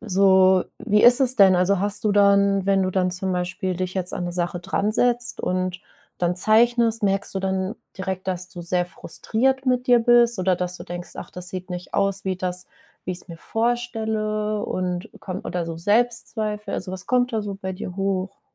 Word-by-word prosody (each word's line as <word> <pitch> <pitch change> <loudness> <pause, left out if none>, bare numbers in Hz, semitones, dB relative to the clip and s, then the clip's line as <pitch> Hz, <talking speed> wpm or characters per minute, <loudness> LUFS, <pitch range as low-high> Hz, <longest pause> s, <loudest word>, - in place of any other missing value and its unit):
so 190 -2 +4
wie 210 -2 +2
ist 245 +2 +8
es 255 -1 +4
denn 190 -2 +6
also, 185 +2 +2
hast 205 0 0
du 210 - +3
dann 200 -1 +3
wenn 195 -1 +3
du 185 - 0
dann 185 -1 0
zum 185 +1 -2
Beispiel 180 +1 -2
dich 185 0 -3
jetzt 185 -1 -2
an 180 - -3
'ne 175 - -4
Sache 175 0 -2
dransetzt 225 +6 0
und 185 0 -2 0.4
dann 175 0 0
zeichnest, 230 +2 +3
merkst 195 0 0
du - - -1
dann 190 +1 -2 0.2
direkt, 190 0 -4
dass 180 0 -2
du 175 - -9
sehr 175 +1 0
frustriert 260 +9 -2
mit 250 0 +1
dir 245 -1 +5
bist 235 -2 +4
oder 185 -1 +2
dass 180 0 -3
du - - -9
denkst: 175 0 -7
„Ach, - - -8
das 180 0 -5
sieht 185 0 -7
nicht 180 0 -7
aus 195 0 0
wie 190 -1 -1
das 180 0 -3 0.4
wie 185 - -2
ich's 180 +1 -8
mir 165 -1 -9
vorstelle“, 220 -2 -2
und 180 -1 -3
kom 190 +1 -5
oder 175 -1 -3
so 165 -1 -5
Selbstzweifel? 215 +1 -1
Also, 185 - -4
was 190 +1 -6
kommt 250 -1 +1
da 220 -2 -1
so 200 -1 -5
bei 190 -1 -5
dir 180 0 -7
hoch? 195 -1 -2
190 Hz, 200 wpm, -23 LUFS, 180-215 Hz, 0.4 s, ist